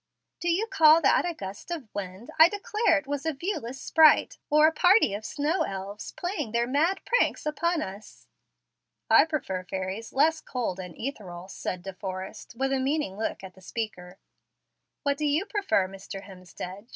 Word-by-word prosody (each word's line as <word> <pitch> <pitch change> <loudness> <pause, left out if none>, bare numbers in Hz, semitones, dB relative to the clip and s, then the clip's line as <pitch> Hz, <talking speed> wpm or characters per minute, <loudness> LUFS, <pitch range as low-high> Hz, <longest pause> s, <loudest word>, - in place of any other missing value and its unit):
"De 345 - -1
you 365 +6 +2
call 320 -8 +6
that 335 +3 +3
a - - -3
gust 195 - -8
of 325 -8 -5
wind? 195 +3 -6
I 320 +2 +9
declare 410 -2 +1
it 285 - -4
was 285 0 -3
a 320 -1 -1
viewless 270 - -4
sprite, 315 -1 +4
or 300 +1 +6
a 315 - +5
party 360 - +4
of 205 +2 -4
snow 300 - -1
elves, 195 +2 -4
playing 355 - -4
their 235 0 +2
mad 310 +9 +1
pranks - - +1
upon 330 +2 0
us." 195 +3 -10 0.9
"I - - +8
prefer 250 - -3
fairies 190 +4 -5
less 315 +3 +3
cold 235 -11 -3
and 180 -3 -7
ethereal," 190 -9 -6
said 180 -2 -5
De 195 0 -6
Forrest, 190 +3 -7
with 270 +1 0
a 270 - +1
meaning 270 -6 -1
look 215 -1 -3
at 190 -1 -9
the 190 - -18
speaker. 185 -3 -6 0.9
"What 285 0 0
do 305 - 0
you 300 +6 +1
prefer, 400 - +1
Mr. 195 0 -9
Hemstead?" 185 +2 -9
260 Hz, 175 wpm, -27 LUFS, 195-320 Hz, 0.9 s, I